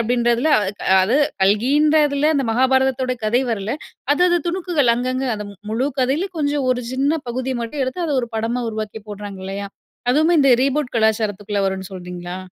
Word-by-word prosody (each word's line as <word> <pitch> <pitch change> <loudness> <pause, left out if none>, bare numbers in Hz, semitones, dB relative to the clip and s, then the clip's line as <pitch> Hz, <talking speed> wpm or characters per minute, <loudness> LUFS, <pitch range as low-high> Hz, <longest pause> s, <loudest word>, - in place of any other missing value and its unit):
அப்டின்றதில 240 +5 +2
அ, 205 -2 -1 0.3
அது 230 +9 +2 0.3
கல்கின்றதுல 290 +7 +3
அந்த 270 -4 0
மகாபாரதத்தோட 260 +1 +2
கதை 240 +5 +2
வரல. 215 0 -2 0.4
அது 355 - +1
அது 350 - +3
துணுக்குகள், 340 -9 +1
அங்கங்க, 255 +2 -2
அந்த 210 0 -6
மு 200 - -14
முழு 250 +5 0
கதைல 280 +10 0
கொஞ்சம் 285 -2 0
ஒரு 250 0 0
சின்ன 275 +3 +1 0.2
பகுதி 255 +2 -2
மட்டும் 270 +4 -3
எடுத்து, 340 +7 -3
அத 300 - -1
ஒரு 235 - -4
படமா 235 +3 -1
உருவாக்கி 215 0 -5
போடுறாங்க 205 -2 -7
இல்லையா? 200 +1 -5 0.4
அதுவுமே 315 +5 +3
இந்த 275 -2 +5
ரீபூட் 275 -1 0
கலாச்சாரத்துக்குள்ள 210 -2 0
வரும்னு 190 0 -4
சொல்றீங்களா? 180 0 -7
250 Hz, 165 wpm, -20 LUFS, 215-280 Hz, 0.4 s, இந்த